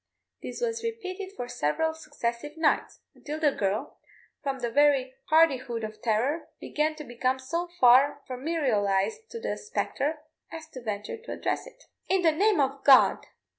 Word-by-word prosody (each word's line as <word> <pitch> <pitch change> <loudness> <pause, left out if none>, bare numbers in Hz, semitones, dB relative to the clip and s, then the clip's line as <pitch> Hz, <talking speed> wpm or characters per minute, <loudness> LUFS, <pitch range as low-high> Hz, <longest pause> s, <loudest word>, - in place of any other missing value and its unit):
This - - -7
was 460 -1 -1
repeated 395 -4 -5
for 245 - -5
several 285 - 0
successive 295 -2 -5
nights, 320 -2 +1
until 300 +1 -6
the 300 -2 +3
girl, 200 -2 -2 0.4
from 275 -2 -2
the 240 -2 -3
very 275 -2 +3
hardihood 265 -8 +3
of 215 0 -7
terror, 250 +9 0
began 310 +1 -1
to 305 - -8
become 255 0 -1
so 335 +7 -3
far 265 +3 +6
familiarised 250 - 0
to 460 - -6
the 460 - -2
spectre 310 -8 -2 0.3
as 325 -1 -8
to 255 - -9
venture 210 - -4
to 465 +2 -10
address - - -2
it. - - -16 0.3
"In 375 -1 +2
the 325 - +5
name 395 +3 +2
of 275 0 0
God!" 270 -2 +6
290 Hz, 160 wpm, -27 LUFS, 245-330 Hz, 0.4 s, far